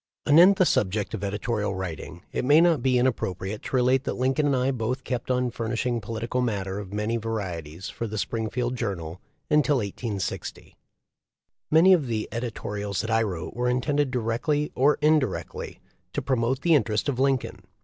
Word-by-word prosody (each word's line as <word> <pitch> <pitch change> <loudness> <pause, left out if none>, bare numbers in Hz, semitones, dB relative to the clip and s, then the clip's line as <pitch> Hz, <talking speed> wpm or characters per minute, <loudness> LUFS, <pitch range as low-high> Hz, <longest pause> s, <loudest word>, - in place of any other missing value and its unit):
Anent 175 +6 +7
the 185 - +4
subject 105 - 0
of 105 -2 -4
editorial 105 0 -2
writing 90 -1 -6
it - - -2
may 145 +5 +6
not 165 -5 +4
be 130 0 +2
inappropriate 110 -5 -1
to - - -4
relate 130 +1 +3
that - - -2
Lincoln 130 +4 +1
and 140 - +2
I 130 +1 +1
both 125 +1 -2
kept 125 -1 -4
on 125 -1 +1
furnishing 115 +1 -2
political 115 +4 -3
matter 100 -5 -2
of 100 -2 -8
many 105 +3 -1
varieties 95 -7 -5
for 115 - -4
the 110 0 -5
Springfield 120 +3 -2
Journal 95 -7 -4 0.3
until 150 -1 +4
1860. 100 -2 -4 0.9
Many 170 +5 +7
of 155 -7 +2
the 110 -2 -2
editorials 105 -4 -3
that 110 +1 -4
I 110 0 +3
wrote 95 -7 -3
were 125 +1 0
intended 140 +3 +1
directly 125 +5 -1
or 140 +3 +3
indirectly 150 -3 0 0.3
to - - -1
promote 130 0 0
the 170 - +3
interest 110 -6 +2
of 135 -3 -1
Lincoln. 135 -1 0
120 Hz, 170 wpm, -26 LUFS, 105-130 Hz, 0.9 s, Anent